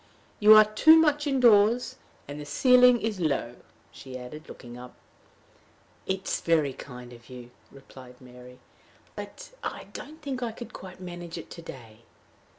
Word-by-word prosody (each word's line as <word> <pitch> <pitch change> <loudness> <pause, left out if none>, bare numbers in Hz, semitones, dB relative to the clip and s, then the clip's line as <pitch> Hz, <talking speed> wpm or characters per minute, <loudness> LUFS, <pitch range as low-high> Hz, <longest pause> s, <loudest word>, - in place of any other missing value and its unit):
"You 215 +1 +8
are 215 0 +8
too 265 +10 +5
much 300 -2 +2
indoors. 245 -1 +3 0.3
And 145 +1 -8
the - - -8
ceiling 250 - +5
is 215 -3 -3
low," 140 -7 -2 0.3
she 130 -1 -10
added, 150 +6 -11
looking 120 -1 -11
up. 125 0 -12 1.1
"It 190 0 -3
is - - -2
very 155 -5 +1
kind 125 -2 -11
of 120 +1 -17
you," 125 -1 -11 0.2
replied 130 -2 -15
Mary, 125 0 -15 0.6
"but - - -10
I - - -5
don't 310 +2 -10
think 275 -4 -5
I 235 -2 -3
could 240 - -10
quite 185 -1 -11
manage 175 -2 -8
it - - -10
to 170 - -10
day." 115 -8 -12
175 Hz, 155 wpm, -26 LUFS, -, 1.1 s, You